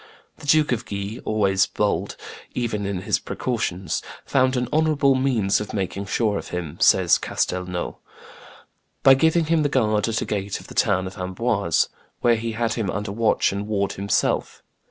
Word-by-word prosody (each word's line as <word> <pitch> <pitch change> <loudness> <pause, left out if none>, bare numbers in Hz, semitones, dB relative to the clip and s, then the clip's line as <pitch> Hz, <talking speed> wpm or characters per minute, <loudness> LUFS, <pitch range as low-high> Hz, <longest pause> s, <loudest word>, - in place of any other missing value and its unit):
The 145 - -11
Duke 155 0 +4
of 120 -1 -2
Guise, 100 +2 -4
always 100 -3 +2
bold, - - -1 0.4
even 105 -5 -2
in 100 -2 -3
his - - +1
precautions, 95 -7 -2 0.2
"found 130 -1 +2
an 125 0 0
honorable 150 -3 +3
means 125 -7 +1
of 105 - -6
making 100 0 -3
sure 105 0 0
of - - -9
him," 85 -3 -5
says - - +5
Castelnau, 90 -1 -2 1.1
"by 135 - +9
giving 160 +4 +3
him 160 0 +2
the 145 - +1
guard 110 -6 +1
at 110 -1 0
a - - -5
gate 100 -1 -3
of - - -13
the - - -9
town 95 -2 +2
of 95 +1 -8
Amboise," 95 -1 0 0.3
where 120 -1 +4
he 115 0 -3
had 115 0 0
him 110 -4 -2
under 105 +1 -3
watch 110 +1 +2
and 100 +1 -4
ward 100 -2 0
himself. 100 +1 -1
105 Hz, 175 wpm, -23 LUFS, 100-125 Hz, 1.1 s, by